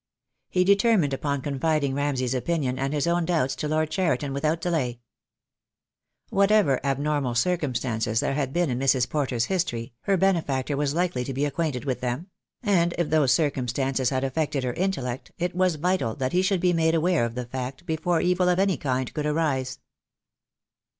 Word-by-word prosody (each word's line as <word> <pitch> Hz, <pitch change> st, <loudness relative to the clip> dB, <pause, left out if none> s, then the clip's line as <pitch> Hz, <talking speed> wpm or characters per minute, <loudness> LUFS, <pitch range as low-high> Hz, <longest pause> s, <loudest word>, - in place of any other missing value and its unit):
He 180 Hz, -, +2 dB
determined 200 Hz, -6 st, +3 dB
upon 140 Hz, 0 st, -2 dB
confiding 145 Hz, 0 st, 0 dB
Ramsay's 135 Hz, -3 st, -1 dB
opinion 130 Hz, -1 st, -1 dB
and 135 Hz, +1 st, -1 dB
his 150 Hz, -2 st, 0 dB
own 170 Hz, 0 st, +1 dB
doubts 160 Hz, -7 st, 0 dB
to 150 Hz, -, -2 dB
Lord 155 Hz, 0 st, 0 dB
Cheriton 145 Hz, -6 st, 0 dB
without 155 Hz, +4 st, 0 dB
delay. 150 Hz, -9 st, -1 dB, 1.3 s
Whatever 200 Hz, -7 st, +3 dB
abnormal 140 Hz, -2 st, 0 dB
circumstances 125 Hz, -7 st, 0 dB
there -, -, 0 dB
had 135 Hz, -2 st, -1 dB
been 170 Hz, -2 st, +1 dB
in 125 Hz, -, -2 dB
Mrs. 130 Hz, -2 st, +2 dB
Porter's 130 Hz, -6 st, 0 dB
history, 125 Hz, -12 st, -2 dB
her 195 Hz, -1 st, +3 dB
benefactor 155 Hz, -7 st, +1 dB
was 145 Hz, +1 st, -1 dB
likely 175 Hz, -7 st, 0 dB
to 135 Hz, +1 st, -5 dB
be 140 Hz, +2 st, +1 dB
acquainted 145 Hz, -3 st, -2 dB
with 130 Hz, -3 st, -2 dB
them; 130 Hz, +10 st, -3 dB, 0.3 s
and 175 Hz, -5 st, +2 dB
if 170 Hz, -3 st, -1 dB
those 150 Hz, -5 st, +4 dB
circumstances 135 Hz, -3 st, 0 dB
had 130 Hz, -1 st, -1 dB
affected 140 Hz, 0 st, -1 dB
her 125 Hz, -1 st, -1 dB
intellect 135 Hz, -9 st, -3 dB
it 175 Hz, 0 st, -2 dB
was 185 Hz, -2 st, +2 dB
vital 165 Hz, -8 st, 0 dB
that 130 Hz, +2 st, -2 dB
he 180 Hz, -, +3 dB
should 190 Hz, -1 st, +1 dB
be 180 Hz, -1 st, +3 dB
made 165 Hz, 0 st, +2 dB
aware 165 Hz, -2 st, +2 dB
of 115 Hz, 0 st, -3 dB
the 125 Hz, -1 st, -3 dB
fact 130 Hz, +5 st, -6 dB
before 165 Hz, 0 st, 0 dB
evil 180 Hz, 0 st, +2 dB
of 180 Hz, -, +2 dB
any 195 Hz, -1 st, +2 dB
kind 130 Hz, -2 st, -2 dB
could 150 Hz, -1 st, -2 dB
arise. 140 Hz, -5 st, 0 dB
145 Hz, 175 wpm, -25 LUFS, 130-175 Hz, 1.3 s, those